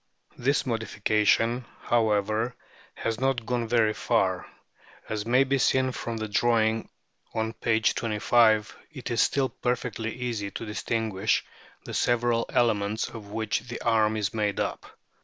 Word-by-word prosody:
This 135 Hz, +3 st, +1 dB
modification, 115 Hz, +1 st, +1 dB, 0.2 s
however, 110 Hz, 0 st, +1 dB, 0.4 s
has 115 Hz, 0 st, -2 dB
not 130 Hz, -3 st, 0 dB
gone 120 Hz, -1 st, -1 dB
very 110 Hz, -2 st, +3 dB
far. -, -, 0 dB, 0.6 s
As 105 Hz, 0 st, -3 dB
may 125 Hz, +3 st, +5 dB
be 135 Hz, 0 st, 0 dB
seen 130 Hz, +1 st, +2 dB
from 115 Hz, -1 st, -4 dB
the 110 Hz, 0 st, -3 dB
drawing 110 Hz, 0 st, +2 dB, 0.5 s
on 110 Hz, 0 st, -1 dB
p. 110 Hz, -1 st, +1 dB
25, 110 Hz, 0 st, +2 dB
it 130 Hz, -6 st, -6 dB
is 120 Hz, -, +2 dB
still 135 Hz, -2 st, +2 dB
perfectly 120 Hz, -2 st, -2 dB
easy 115 Hz, -4 st, -3 dB
to 115 Hz, -, -6 dB
distinguish 110 Hz, -1 st, -1 dB, 0.4 s
the -, -, -7 dB
several 120 Hz, -1 st, +1 dB
elements 110 Hz, -2 st, +1 dB
of 110 Hz, -3 st, -9 dB
which 105 Hz, 0 st, -1 dB
the 120 Hz, -, -5 dB
arm 110 Hz, -2 st, +2 dB
is 105 Hz, -1 st, -1 dB
made 105 Hz, -2 st, -1 dB
up. -, -, -3 dB
115 Hz, 140 wpm, -27 LUFS, 110-120 Hz, 0.6 s, may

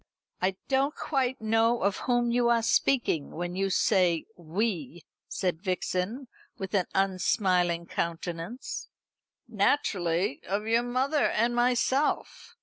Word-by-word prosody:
"I 185 Hz, +1 st, +1 dB
don't 275 Hz, +2 st, +1 dB
quite 260 Hz, -3 st, -1 dB
know 225 Hz, +1 st, +2 dB
of 200 Hz, 0 st, +1 dB
whom 240 Hz, -1 st, +2 dB
you 240 Hz, 0 st, +2 dB
are 230 Hz, -1 st, +3 dB
speaking 230 Hz, -, +1 dB
when 175 Hz, +2 st, -5 dB
you 195 Hz, +1 st, 0 dB
say 180 Hz, -4 st, +2 dB
'we,'" 175 Hz, -, -3 dB, 0.2 s
said 180 Hz, -4 st, -2 dB
Vixen, 190 Hz, +6 st, -2 dB, 0.3 s
with 190 Hz, +1 st, -6 dB
an 190 Hz, -3 st, +2 dB
unsmiling 185 Hz, -2 st, +1 dB
countenance. 170 Hz, +7 st, -4 dB, 0.6 s
"Naturally 195 Hz, -, 0 dB
of 200 Hz, +3 st, -1 dB
your 230 Hz, +1 st, +3 dB
mother 260 Hz, +5 st, +1 dB
and 235 Hz, +2 st, +1 dB
myself. 250 Hz, +4 st, 0 dB
200 Hz, 120 wpm, -28 LUFS, 180-240 Hz, 0.6 s, are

